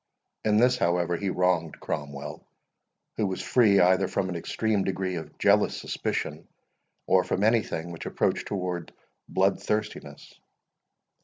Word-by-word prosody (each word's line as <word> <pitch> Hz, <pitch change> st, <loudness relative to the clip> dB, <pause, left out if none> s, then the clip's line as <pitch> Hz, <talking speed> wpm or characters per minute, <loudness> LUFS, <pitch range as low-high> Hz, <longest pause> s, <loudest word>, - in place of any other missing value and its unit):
In 105 Hz, -1 st, +3 dB
this, 125 Hz, +2 st, +4 dB
however, 85 Hz, -2 st, +1 dB
he 100 Hz, +3 st, -2 dB
wronged 90 Hz, -3 st, 0 dB
Cromwell, 70 Hz, 0 st, -5 dB, 0.7 s
who 110 Hz, -, +1 dB
was 95 Hz, -, -3 dB
free 105 Hz, -6 st, +4 dB
either 95 Hz, +2 st, +4 dB
from 95 Hz, -, -1 dB
an 90 Hz, -, -4 dB
extreme 105 Hz, +4 st, 0 dB
degree 95 Hz, -1 st, -2 dB
of 80 Hz, -3 st, -7 dB
jealous -, -, +3 dB
suspicion, -, -, -3 dB, 0.6 s
or -, -, +4 dB
from 100 Hz, -, -1 dB
any 110 Hz, +1 st, +4 dB
thing 85 Hz, -3 st, -5 dB
which 85 Hz, -, -7 dB
approached -, -, 0 dB
towards 90 Hz, -4 st, -3 dB, 0.4 s
blood -, -, +2 dB
thirstiness. 105 Hz, 0 st, -4 dB
95 Hz, 140 wpm, -27 LUFS, 85-105 Hz, 0.7 s, this